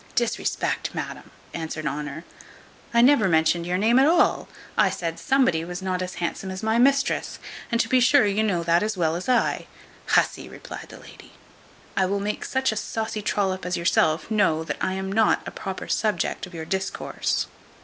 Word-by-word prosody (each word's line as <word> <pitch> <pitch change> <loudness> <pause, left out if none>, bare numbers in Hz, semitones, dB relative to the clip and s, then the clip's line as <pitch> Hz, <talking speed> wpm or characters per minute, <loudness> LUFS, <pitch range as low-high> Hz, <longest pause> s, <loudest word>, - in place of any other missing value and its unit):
"Disrespect, 235 -1 -1
madam!" - - -6 0.2
answered 160 -1 -5
Honour; 150 +2 -4 0.7
"I 235 0 +5
never 245 -7 +5
mentioned 165 +1 +2
your 180 +1 0
name 225 +6 +4
at 270 - +5
all: 340 +2 +3 0.3
I - - +4
said 165 -1 -4
somebody 255 -12 +2
was 180 +2 -6
not 185 -1 -1
as 185 0 -4
handsome 175 +2 -3
as 190 +2 -6
my 220 +1 +2
mistress, 275 +2 +2 0.3
and 235 - +1
to - - +2
be 255 - +4
sure 260 0 +5
you 205 +1 +1
know 190 -6 0
that 170 +1 +3
as 215 -1 -2
well 165 -2 +1
as 180 +7 -4
I." 250 -2 +1 0.4
"Hussy," - - +1
replied - - -9
the - - -11
lady, - - -15 0.6
"I 190 -1 +2
will 200 +1 -1
make 205 +1 -3
such 265 -2 0
a - - -4
saucy 220 0 -3
trollop 190 -2 -1
as 180 0 -2
yourself 165 0 +1
know 190 -7 +2
that 155 -2 -4
I 185 - 0
am 190 0 -3
not 220 +2 +2
a - - -5
proper 190 -3 -6
subject 215 -3 -1
of 180 - -13
your 160 -1 -5
discourse. 190 +3 -2
190 Hz, 190 wpm, -24 LUFS, 170-220 Hz, 0.7 s, I